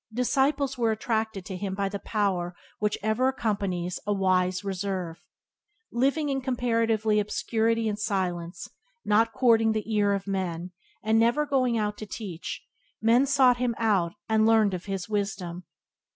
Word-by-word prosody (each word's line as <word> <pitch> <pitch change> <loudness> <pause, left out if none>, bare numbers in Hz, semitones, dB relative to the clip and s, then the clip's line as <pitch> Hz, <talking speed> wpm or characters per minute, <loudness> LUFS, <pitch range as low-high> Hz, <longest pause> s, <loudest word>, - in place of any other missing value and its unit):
Disciples 270 +3 +1
were 230 -1 +2
attracted 220 -3 -2
to 190 - -6
him 190 +1 -3
by 200 0 0
the 200 +1 -4
power 185 -5 -1 0.2
which 210 0 0
ever 220 +4 +2
accompanies 200 -8 -1
a - - +1
wise 185 -2 +1
reserve. 190 -3 -3 0.7
Living 280 +5 +1
in 270 -1 -1
comparative 230 -4 0
obscurity 220 +2 +1
and 210 -1 -2
silence, 175 -5 -2 0.4
not 225 +2 +3
courting 225 -3 +3
the 220 +1 -3
ear 205 -1 +3
of 195 -1 -2
men, 185 -3 -3 0.3
and 220 +1 +3
never 240 +6 +3
going 255 -4 +1
out 210 -1 -2
to 215 - -6
teach, 190 -6 -6 0.4
men 235 +5 +4
sought 260 -3 +5
him 245 -2 0
out 195 -7 +1
and 220 0 +3
learned 220 -3 +4
of 180 -1 -5
him 195 -1 -2
wisdom. 195 -4 -3
215 Hz, 150 wpm, -27 LUFS, 195-230 Hz, 0.7 s, sought